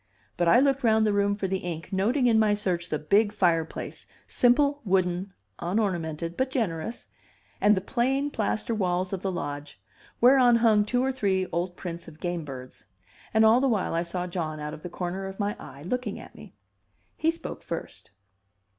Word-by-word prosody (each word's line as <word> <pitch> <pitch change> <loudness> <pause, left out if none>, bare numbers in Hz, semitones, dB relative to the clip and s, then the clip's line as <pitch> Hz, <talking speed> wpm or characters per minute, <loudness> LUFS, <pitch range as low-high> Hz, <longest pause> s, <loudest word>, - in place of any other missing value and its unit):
But 175 - +1
I 235 - +7
looked 275 0 +2
round 220 -1 +4
the 210 - +2
room 205 0 +2
for 205 - -3
the 190 0 -1
ink, 170 +1 -6
noting 235 +8 +2
in 225 -2 +5
my 210 -1 +3
search 180 -4 -2
the 155 - 0
big 200 +8 +2
fireplace, 170 -6 -1 0.2
simple, 280 +4 +3
wooden, 185 -1 0 0.3
unornamented, 170 -4 -1
but 260 0 0
generous, 225 -3 -2 0.6
and 210 -1 +5
the - - 0
plain 270 +6 0
plaster 220 0 -1
walls 185 -2 0
of 190 - -3
the 195 - -1
lodge, 145 -4 -5 0.4
whereon 250 -1 +6
hung 220 -3 +4
two 245 +3 +1
or 265 - +1
three 195 -7 0
old 175 +2 -2
prints 170 -2 -6
of 160 -1 -13
gamebirds; 150 -8 -6 0.4
and 220 0 +4
all 225 +3 +6
the 270 - +3
while 215 -5 0
I 165 - +1
saw 175 +1 -3
John 165 -4 -4
out 150 0 -5
of 155 - -9
the 180 - -6
corner 185 +2 -4
of 190 +1 -9
my 205 0 -1
eye, 140 +1 -11
looking 235 +3 -3
at - - -12
me. - - -14 0.6
He 320 - +1
spoke 330 0 -5
first. - - -7
195 Hz, 185 wpm, -27 LUFS, 175-230 Hz, 0.6 s, I